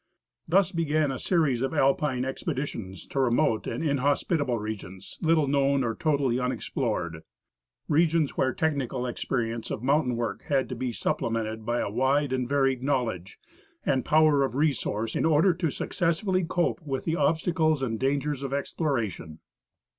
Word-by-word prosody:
Thus 180 +1 +3
began 155 -3 +1
a 130 - -4
series 155 -9 +1
of 135 +4 -1
Alpine 135 -2 +2
expeditions 130 - -4
to 140 - -4
remote 120 -2 +2
and 115 - -3
inhospitable 145 -1 +1
regions, 100 -3 -7
little 160 -3 +3
known 140 0 +2
or 115 -2 -1
totally 140 -3 +1
unexplored 115 - -2 0.4
— - - -64 0.3
regions 160 -1 +2
where 130 - +2
technical 135 -4 -1
experience 120 -2 -2
of 110 - -4
mountain 135 -2 +2
work 115 0 -3
had 135 -2 +1
to 125 - -4
be 125 +1 -2
supple 115 - -1
mented 110 -1 -3
by 120 +1 0
a - - -2
wide 135 +4 +1
and 125 -2 -1
varied 135 -2 +2
knowledge 120 -9 -2 0.5
and 130 -2 +1
power 155 -2 +4
of 135 - -2
resource 120 -7 0
in - - +1
order 160 +3 +4
to 165 -1 -1
successfully 185 +5 0
cope 175 +2 0
with 135 -4 -4
the 160 - 0
obstacles 155 -1 +1
and 115 -4 -2
dangers 140 +1 0
of 135 -1 -4
exploration. 115 - -2
135 Hz, 155 wpm, -27 LUFS, 120-155 Hz, 0.5 s, power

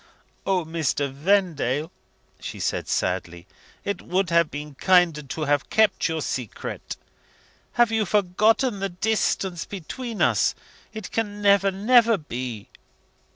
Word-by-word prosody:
"O, 185 -3 +1
Mr. 155 -4 -1
Vendale," 160 -2 +1 0.5
she - - -7
said - - -2
sadly, 85 -1 -2 0.4
"it 200 - -2
would 185 0 -1
have 170 -2 +4
been 150 0 -7
kinder 175 -1 +3
to 145 +3 -6
have 145 -1 0
kept 220 -3 +3
your 160 -2 -2
secret. 125 -5 -5 0.8
Have 240 -2 +3
you 220 -3 +1
forgotten 210 +4 +2
the 195 0 -1
distance 190 -2 -1
between 215 +5 -6
us? - - +3 0.4
It 220 -4 -8
can 205 -2 -2
never, 200 -1 +4
never 230 +3 +4
be!" 125 - -6
180 Hz, 125 wpm, -24 LUFS, 150-205 Hz, 0.8 s, have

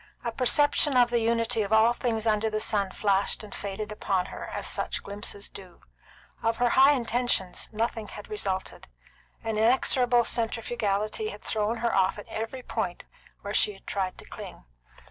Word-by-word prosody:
A 235 - -1
perception 290 +3 +3
of 240 -1 +5
the 240 - +3
unity 230 0 +1
of 200 0 -3
all 220 +2 +5
things 230 -2 -2
under 220 0 +2
the 215 0 -1
sun 205 -2 +1
flashed 200 +2 +1
and 210 - -10
faded 205 +2 -5
upon 195 -3 0
her, - - -6
as - - -5
such - - -2
glimpses 200 0 -5
do. 185 -3 -12 0.6
Of 225 0 +1
her 245 0 +3
high 270 +4 +6
intentions, 240 -7 -1
nothing 225 0 -2
had 205 - -9
resulted. 195 -3 -3 0.6
An 220 -1 -1
inexorable 245 +1 +4
centrifugality 225 - -1
had - - -10
thrown 220 +1 -1
her 235 - +1
off 190 +1 +2
at 205 - -9
every 225 +4 -5
point 200 -8 -3 0.4
where 200 +1 -5
she 210 -2 +2
tried 190 -2 -3
to - - -11
cling. - - -9
220 Hz, 165 wpm, -27 LUFS, 205-235 Hz, 0.6 s, high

